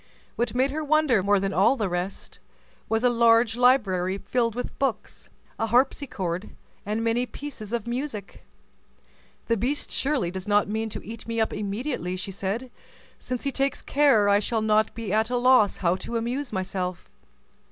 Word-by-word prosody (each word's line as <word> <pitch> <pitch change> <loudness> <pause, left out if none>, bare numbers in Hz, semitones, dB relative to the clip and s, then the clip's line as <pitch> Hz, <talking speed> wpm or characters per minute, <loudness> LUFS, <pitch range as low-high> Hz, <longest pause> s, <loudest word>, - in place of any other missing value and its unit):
What 240 0 -1
made 260 +2 +2
her 310 +2 -3
wonder 300 -7 +3
more 200 +1 +3
than 195 0 -2
all 195 +8 +4
the 215 -6 -1
rest, 180 +2 -4 0.5
was 225 +1 +1
a 250 - +5
large 230 -1 +4
library 200 -7 +3
filled 230 +1 -1
with 245 - -5
books, 260 -6 -3 0.3
a 225 - 0
harpsichord, 220 - 0 0.4
and 215 +2 -1
many 235 +2 +1
pieces 245 -8 -8
of 235 -3 -2
music. 235 -4 -5 1.0
"The 230 - +1
beast 260 +8 -1
surely 270 -11 0
does 190 +1 -6
not 205 0 +3
mean 220 +2 -2
to 210 - -7
eat 225 +1 -9
me 230 0 -2
up 220 - +1
immediately," 205 - -3
said 195 +3 -3
she, 260 -2 -12 0.5
"since 250 -1 -4
he 280 - 0
takes 275 0 -1
care 275 -8 +4
I 200 0 +5
shall 220 +1 -1
not 215 0 +2
be 225 -4 -4
at 220 +1 +2
a 250 - 0
loss 250 -4 +4
how 175 -1 +1
to 235 +4 -4
amuse 245 +4 -3
myself." 185 -2 -3
225 Hz, 175 wpm, -25 LUFS, 200-250 Hz, 1.0 s, a